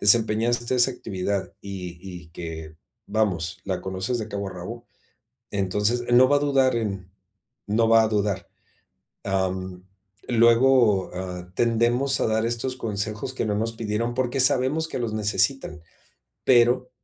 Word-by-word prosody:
desempeñaste 115 Hz, +3 st, +3 dB
esa 125 Hz, +1 st, +4 dB
actividad, 95 Hz, -4 st, -4 dB
y 90 Hz, -3 st, -7 dB
y 90 Hz, -3 st, -10 dB
que, 80 Hz, -2 st, -8 dB, 0.3 s
vamos, 95 Hz, -4 st, -1 dB
la 95 Hz, -2 st, -3 dB
conoces 95 Hz, +6 st, -3 dB
de 110 Hz, -1 st, -5 dB
cabo 100 Hz, -1 st, -4 dB
a -, -, -8 dB
rabo. 100 Hz, +7 st, -8 dB, 0.6 s
Entonces, 105 Hz, +5 st, 0 dB
eh, -, -, -1 dB
no 130 Hz, +1 st, +6 dB
va 145 Hz, -, +4 dB
a -, -, +3 dB
dudar 135 Hz, -3 st, +2 dB
en 95 Hz, -5 st, -4 dB, 0.6 s
no 115 Hz, +2 st, +2 dB
va 115 Hz, 0 st, +6 dB
a -, -, 0 dB
dudar. 100 Hz, -3 st, -1 dB, 0.8 s
Am, 95 Hz, -1 st, -2 dB, 0.4 s
luego, 115 Hz, -3 st, +4 dB
ah, 90 Hz, -1 st, -6 dB
tendemos 120 Hz, +3 st, +2 dB
a -, -, +2 dB
dar 110 Hz, +1 st, 0 dB
estos 120 Hz, +2 st, -2 dB
consejos 110 Hz, +2 st, -3 dB
que -, -, -2 dB
no 105 Hz, -, -1 dB
nos 115 Hz, +2 st, -1 dB
pidieron, 115 Hz, +1 st, -2 dB
porque 130 Hz, +1 st, -1 dB
sabemos 130 Hz, +5 st, +3 dB
que -, -, -5 dB
los 115 Hz, -3 st, -3 dB
necesitan, 105 Hz, -, 0 dB, 0.6 s
pero 125 Hz, 0 st, +4 dB
110 Hz, 150 wpm, -24 LUFS, 95-120 Hz, 0.8 s, no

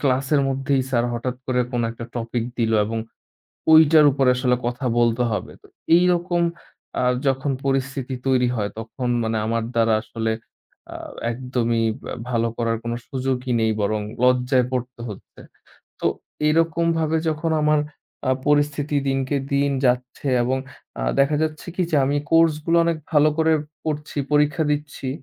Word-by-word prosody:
ক্লাসের 135 Hz, +1 st, +2 dB
মধ্যেই 135 Hz, 0 st, 0 dB
স্যার 120 Hz, -2 st, +2 dB
হঠাৎ 125 Hz, +1 st, -3 dB
করে 125 Hz, -1 st, +1 dB
কোনো 120 Hz, -1 st, 0 dB
একটা 115 Hz, 0 st, -8 dB
টপিক 115 Hz, 0 st, -2 dB
দিল 115 Hz, -1 st, +1 dB
এবং 115 Hz, +1 st, -3 dB, 0.7 s
ঐটার 155 Hz, -1 st, +7 dB
উপরে 135 Hz, -1 st, +2 dB
আসলে 125 Hz, -1 st, +2 dB
কথা 125 Hz, +2 st, -3 dB
বলতে 120 Hz, +1 st, +2 dB
হবে। 105 Hz, -3 st, -3 dB
তো -, -, -18 dB, 0.3 s
এইরকম 175 Hz, 0 st, +2 dB, 0.6 s
আ -, -, +1 dB, 0.2 s
যখন 135 Hz, +1 st, +1 dB
পরিস্থিতি 135 Hz, -1 st, -1 dB
তৈরি 130 Hz, -2 st, +3 dB
হয় 105 Hz, -2 st, -1 dB
তখন 115 Hz, +3 st, -5 dB, 0.2 s
মানে 110 Hz, 0 st, -1 dB
আমার 115 Hz, +1 st, 0 dB
দ্বারা 115 Hz, -1 st, +3 dB
আসলে 110 Hz, 0 st, -3 dB, 0.6 s
আ -, -, -10 dB, 0.4 s
একদমই 120 Hz, -2 st, -1 dB
ইব 110 Hz, -, -7 dB, 0.3 s
ভালো 115 Hz, -2 st, +1 dB
করার 115 Hz, -1 st, 0 dB
কোনো 120 Hz, 0 st, -2 dB
সুযোগই 130 Hz, -1 st, -2 dB
নেই 110 Hz, -, +2 dB
বরং 105 Hz, +1 st, 0 dB, 0.2 s
লজ্জায় 125 Hz, 0 st, +3 dB
পড়তে 125 Hz, -1 st, -4 dB
হচ্ছে। 105 Hz, -, -11 dB, 0.6 s
তো -, -, 0 dB, 0.4 s
এরকমভাবে 165 Hz, 0 st, +1 dB
যখন 160 Hz, +1 st, -1 dB
আমার 150 Hz, 0 st, +3 dB, 0.5 s
আ -, -, +4 dB, 0.2 s
পরিস্থিতি 145 Hz, 0 st, +1 dB
দিনকে 135 Hz, +1 st, 0 dB, 0.2 s
দিন 140 Hz, 0 st, +2 dB, 0.2 s
যাচ্ছে 125 Hz, +3 st, -1 dB
এবং 130 Hz, +2 st, 0 dB, 0.4 s
আ -, -, -2 dB, 0.2 s
দেখা 145 Hz, +2 st, +3 dB
যাচ্ছে 155 Hz, -1 st, -3 dB
কী 185 Hz, -, +1 dB
যে 155 Hz, -, +2 dB
আমি 140 Hz, +2 st, +1 dB
কোর্সগুলো 165 Hz, 0 st, +3 dB
অনেক 170 Hz, -1 st, +1 dB, 0.2 s
ভালো 150 Hz, 0 st, +5 dB
করে 160 Hz, 0 st, +3 dB, 0.3 s
পড়ছি, 150 Hz, -1 st, -3 dB
পরীক্ষা 150 Hz, +2 st, +3 dB
দিচ্ছি। 145 Hz, -2 st, -4 dB
130 Hz, 150 wpm, -22 LUFS, 120-150 Hz, 0.7 s, ঐটার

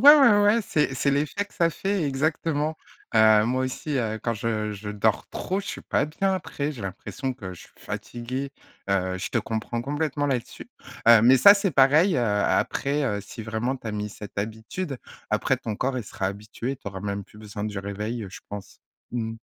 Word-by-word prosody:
ouais, 235 Hz, -8 st, +6 dB
ouais, 220 Hz, +3 st, +4 dB
c'est 150 Hz, -8 st, 0 dB
c'est 140 Hz, +2 st, +1 dB
l'effet 150 Hz, +8 st, 0 dB
que 205 Hz, -, -20 dB
ça 170 Hz, -1 st, +3 dB
fait 195 Hz, +1 st, -1 dB
exactement. 155 Hz, +2 st, 0 dB, 0.4 s
Heu, 110 Hz, -1 st, +6 dB
moi 130 Hz, +2 st, +1 dB
aussi, 140 Hz, +2 st, -3 dB
heu, 110 Hz, -2 st, -1 dB
quand 115 Hz, -, +1 dB
je 110 Hz, -1 st, -2 dB
je 105 Hz, 0 st, -6 dB
dors 105 Hz, +1 st, +1 dB
trop, 190 Hz, +2 st, -2 dB
je 200 Hz, -, -7 dB
suis -, -, -5 dB
pas 140 Hz, -, +1 dB
bien 190 Hz, +5 st, 0 dB
après, 150 Hz, -5 st, -3 dB
j'ai 120 Hz, -7 st, -9 dB
l'impression 115 Hz, +7 st, -4 dB
que 95 Hz, -7 st, -7 dB
je -, -, -12 dB
suis -, -, -16 dB
fatigué, 130 Hz, +4 st, -5 dB, 0.4 s
heu, 95 Hz, -1 st, +1 dB
je -, -, -4 dB
te -, -, 0 dB
comprends 115 Hz, +1 st, -2 dB
complètement 145 Hz, +1 st, -1 dB
là-dessus. 125 Hz, -4 st, -3 dB, 0.4 s
Heu, 115 Hz, -2 st, +9 dB
mais 130 Hz, +2 st, +8 dB
ça, 200 Hz, +10 st, +10 dB
c'est 200 Hz, -3 st, 0 dB
pareil, 145 Hz, +7 st, +5 dB
heu, 120 Hz, -, +2 dB
après, 135 Hz, +7 st, +1 dB
heu, 105 Hz, -5 st, 0 dB
si 110 Hz, +3 st, -9 dB
vraiment 115 Hz, +4 st, -1 dB
tu 125 Hz, -, -14 dB
as -, -, -2 dB
mis 105 Hz, 0 st, -3 dB
cette 105 Hz, 0 st, -10 dB
habitude. 110 Hz, -, -4 dB, 0.3 s
Après -, -, +1 dB
ton 110 Hz, -2 st, -4 dB
corps 130 Hz, +2 st, -1 dB
il 120 Hz, -, -3 dB
sera 95 Hz, -, -2 dB
habitué, 110 Hz, +6 st, -5 dB
tu 115 Hz, -, -9 dB
auras 95 Hz, -1 st, -6 dB
même 100 Hz, -1 st, -3 dB
plus 105 Hz, -, -18 dB
besoin 105 Hz, -1 st, -7 dB
du 105 Hz, -2 st, -4 dB
réveil 105 Hz, +3 st, -4 dB
je -, -, -10 dB
pense. 100 Hz, -1 st, -8 dB, 0.3 s
Mmh. 115 Hz, -2 st, -3 dB
120 Hz, 205 wpm, -25 LUFS, 105-145 Hz, 0.4 s, ça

